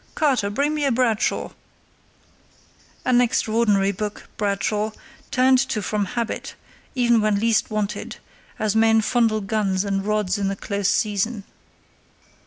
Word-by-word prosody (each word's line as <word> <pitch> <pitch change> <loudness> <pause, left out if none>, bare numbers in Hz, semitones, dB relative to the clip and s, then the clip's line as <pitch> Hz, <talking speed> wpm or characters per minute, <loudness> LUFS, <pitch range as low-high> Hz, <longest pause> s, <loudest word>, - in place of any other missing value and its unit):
Carter, 265 -9 +1
bring 285 +9 0
me 300 -1 -1
a 275 - +2
Bradshaw"—(an 235 -2 0 1.7
extraordinary 215 -4 +2
book, 210 +1 -5
Bradshaw, 210 +1 -1 0.4
turned 260 0 +4
to 220 - -1
from 210 +1 -1
habit, 235 +3 -4 0.4
even 240 -3 +3
when 210 -1 +1
least 225 0 +2
wanted, 210 -1 -3 0.4
as 215 0 -1
men 225 0 +4
fondle 225 -1 +1
guns 195 -2 0
and 195 -1 -1
rods 210 -2 0
in 200 - 0
the 195 - -1
close 200 0 -2
season). 210 0 0
215 Hz, 125 wpm, -22 LUFS, 200-235 Hz, 1.7 s, turned